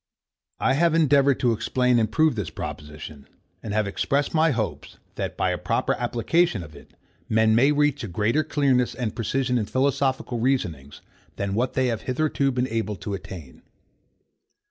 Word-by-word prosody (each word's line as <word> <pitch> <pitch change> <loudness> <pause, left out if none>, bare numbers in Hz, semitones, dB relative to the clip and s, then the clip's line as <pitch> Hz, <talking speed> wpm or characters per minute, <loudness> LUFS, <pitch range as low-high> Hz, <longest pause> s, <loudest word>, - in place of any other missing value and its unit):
I - - +2
have 165 +3 +3
endeavoured 140 -4 +4
to 120 - +3
explain 125 +2 +1
and 110 -1 0
prove 155 +5 +3
this 105 -8 -4
proposition, 75 -2 -8 0.3
and 110 - -6
have 105 0 +1
expressed 140 +8 -1
my 160 0 +4
hopes, 115 -7 -3 0.2
that, - - -4
by - - +1
a - - -3
proper - - 0
application 120 - 0
of 75 -1 -13
it, - - -16 0.3
men 110 0 +3
may 130 +6 +4
reach 150 -2 +1
a - - -3
greater 110 - +1
clearness 140 -5 +1
and 120 -5 -3
precision 125 +2 0
in 105 - -2
philosophical 130 -1 0
reasonings, 85 - -2 0.3
than 100 -1 -3
what 120 +5 0
they 130 - +1
have 115 -3 -1
hitherto 140 +1 0
been 125 0 -1
able 110 -3 -2
to 100 +2 -6
attain. 90 -8 -9
125 Hz, 165 wpm, -24 LUFS, 105-140 Hz, 0.3 s, endeavoured